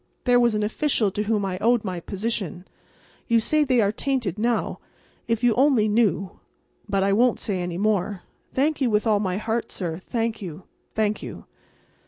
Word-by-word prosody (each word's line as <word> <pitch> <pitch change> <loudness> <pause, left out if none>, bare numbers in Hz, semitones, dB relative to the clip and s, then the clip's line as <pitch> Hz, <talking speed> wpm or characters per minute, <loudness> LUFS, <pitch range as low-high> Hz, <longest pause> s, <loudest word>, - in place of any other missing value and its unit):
There 245 -1 +4
was 235 -2 +3
an 210 - 0
official 225 -2 +1
to 210 - -2
whom 210 -2 +1
I 185 -1 -3
owed 235 +1 +3
my 185 -4 -3
position. 195 -2 -3 0.6
You 230 -1 +4
say 305 +7 +2
they 255 -4 +3
are 200 -1 +2
tainted 230 -5 -2
now. 235 +1 0 0.5
If 230 0 0
you 240 -2 +5
only 255 -3 +4
knew—but 205 -2 -2
I 195 0 +2
won't 240 +3 +3
say 195 -3 -2
any 175 -1 -3
more. 205 -2 0 0.3
Thank 290 +3 0
you 255 - +3
with 210 0 +1
all 215 -2 +3
my 185 -2 -1
heart, 225 +2 -2
sir—thank 215 +6 -3
you—thank 205 +4 -4
you." - - -8
215 Hz, 170 wpm, -24 LUFS, 195-235 Hz, 0.6 s, you